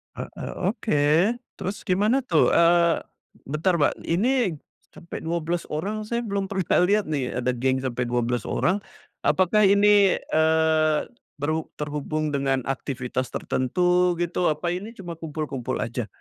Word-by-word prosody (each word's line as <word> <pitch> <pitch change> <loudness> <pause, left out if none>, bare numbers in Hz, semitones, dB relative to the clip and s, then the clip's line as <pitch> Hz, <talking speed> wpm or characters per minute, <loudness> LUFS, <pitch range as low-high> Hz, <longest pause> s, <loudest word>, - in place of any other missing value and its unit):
Heeh, - - -7 0.2
oke. 145 - -1 0.6
Terus 195 +2 -4
gimana 215 +7 +2
tuh? 165 -10 +3
Eee, 170 0 +4 0.5
bentar 155 +5 +1
Mbak, 150 -4 +2
ini 210 +1 +1 0.4
sampai 170 - -8
12 170 +1 -2
orang 210 +8 -3
saya 235 +1 -1
belum 200 -2 -2
pernah 190 -3 +1
lihat 205 +1 +2
nih 130 -5 -2
ada 125 0 0
geng 130 +2 0
sampai 125 -1 -2
12 120 -1 -1
orang. 190 +4 +1 0.5
Apakah 195 +3 +3
ini, 200 0 +5
eee, 160 -1 +2 0.4
berhub 155 +2 -2
terhubung 150 +1 -2
dengan 135 -1 +1
aktivitas 130 -1 -3
tertentu, 180 +7 +1
gitu? 175 +1 0
Apa 155 +3 -1
ini 195 +5 -5
cuma 175 -3 -6
kumpul-kumpul 150 -5 -4
aja? 115 -1 -3
160 Hz, 135 wpm, -24 LUFS, 140-190 Hz, 0.6 s, ini